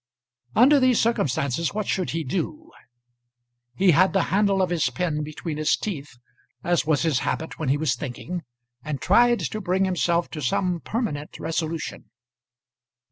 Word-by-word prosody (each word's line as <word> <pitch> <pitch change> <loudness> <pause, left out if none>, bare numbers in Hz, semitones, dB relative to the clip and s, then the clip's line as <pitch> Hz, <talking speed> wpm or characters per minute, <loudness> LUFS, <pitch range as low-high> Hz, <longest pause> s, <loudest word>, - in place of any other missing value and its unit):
Under 280 +4 +6
these 255 -3 +4
circumstances, 160 - 0
what 215 -1 -1
should 185 -2 -1
he 165 0 -2
do? 300 - -4 1.0
He 190 +6 +4
had 185 +4 +4
the 195 -3 +3
handle 200 -1 +3
of 185 -2 +1
his 170 -3 +1
pen 165 -4 -2
between 155 +1 -5
his 155 0 +2
teeth, 150 - -6 0.5
as 175 -3 +1
was 155 -1 +2
his 155 -6 +2
habit 160 - -3
when 155 -4 -1
he 140 - +3
was 145 -4 +1
thinking, 155 +6 -5 0.4
and 150 -3 -4
tried 240 +4 +4
to 215 - -3
bring 190 +1 +1
himself 175 -2 +1
to 155 - -5
some 175 +6 0
permanent 165 - -4
resolution. 160 0 -4
170 Hz, 155 wpm, -24 LUFS, 150-195 Hz, 1.0 s, Under